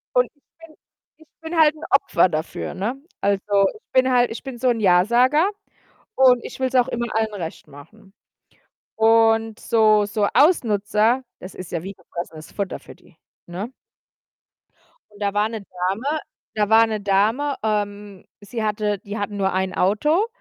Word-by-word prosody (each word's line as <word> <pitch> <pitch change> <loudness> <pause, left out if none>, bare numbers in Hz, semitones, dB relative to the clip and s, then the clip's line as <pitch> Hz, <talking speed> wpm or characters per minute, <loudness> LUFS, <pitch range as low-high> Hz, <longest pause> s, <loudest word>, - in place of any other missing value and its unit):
Und - - +3
ich 285 - -37 0.2
bin 310 -1 -19 0.4
ich 315 0 -21
bin 325 +1 -5
halt 305 -1 +5
'n 310 - -13
Opfer 185 -9 +3
dafür, 155 0 -4
ne? 205 +7 -3 0.3
Also, 200 0 +2
ich 430 - -20
bin 260 0 +3
halt 245 -1 +3
ich 225 - -7
bin 265 -3 -7
so'n 240 -1 +1
Ja-Sager, 235 - +4 0.7
und 250 -2 +5
ich - - -9
will's 260 0 -1
auch 250 -1 +4
immer 235 0 -2
allen 220 -1 0
recht 170 -5 -7
machen 165 +8 -16 0.8
und 225 0 +3
so 215 -2 +3
so 205 0 0
Ausnutzer, 230 - +2 0.2
das 185 - -10
ist 185 - -9
ja 170 -1 -3
wie 195 +1 -7
gefressenes 170 -3 -9
Futter 200 -2 -4
für - - -14
die, - - -24 0.3
ne? 190 +7 -6 1.4
Und 205 - -18
da 200 -1 0
war 210 +1 +2
'ne 225 -2 -6
Dame 195 +11 -2 0.4
da 210 -1 0
war 225 +1 +6
'ne 215 -2 -3
Dame, 220 +9 +1
ähm, 205 -2 -3 0.2
sie 215 +2 -5
hatte 210 -1 -1
die 205 +3 -7
hatten 205 0 -4
nur 195 -1 0
ein 190 0 -1
Auto, 300 - +2
215 Hz, 165 wpm, -22 LUFS, 195-245 Hz, 1.4 s, war